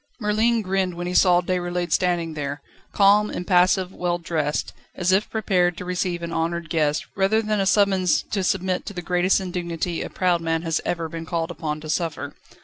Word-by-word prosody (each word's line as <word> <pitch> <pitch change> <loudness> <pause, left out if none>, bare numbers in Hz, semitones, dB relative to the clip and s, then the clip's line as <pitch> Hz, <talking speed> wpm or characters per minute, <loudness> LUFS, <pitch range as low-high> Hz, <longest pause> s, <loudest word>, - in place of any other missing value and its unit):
Merlin 220 +1 +1
grinned 190 -2 -1
when 175 +1 -5
he 180 - -3
saw 180 -1 +5
Déroulède 175 -1 -2
standing 175 -3 +1
there, 145 -1 -5 0.3
calm, 205 +1 +4
impassive, 180 +1 +2
well 175 -1 -1
dressed, 160 -3 -2 0.2
as 180 0 +1
if 195 +3 +2
prepared 180 -5 +1
to 180 - -6
receive 180 -1 -2
an 170 0 -4
honoured 165 0 -2
guest, 150 -2 +1
rather 195 +3 +2
than 215 -1 -1
a 195 - +1
summons 190 -3 +3
to 195 -2 0
submit 185 0 -1
to 205 - -5
the 180 -2 -6
greatest 180 +2 +2
indignity 175 -2 -3
a - - -4
proud 180 -2 +1
man 165 0 -1
has 165 -2 0
ever 170 -2 -2
been 165 0 -7
called 170 -1 -2
upon 155 -3 -4
to 155 - -8
suffer. 155 -3 -2
180 Hz, 190 wpm, -23 LUFS, 165-190 Hz, 0.3 s, saw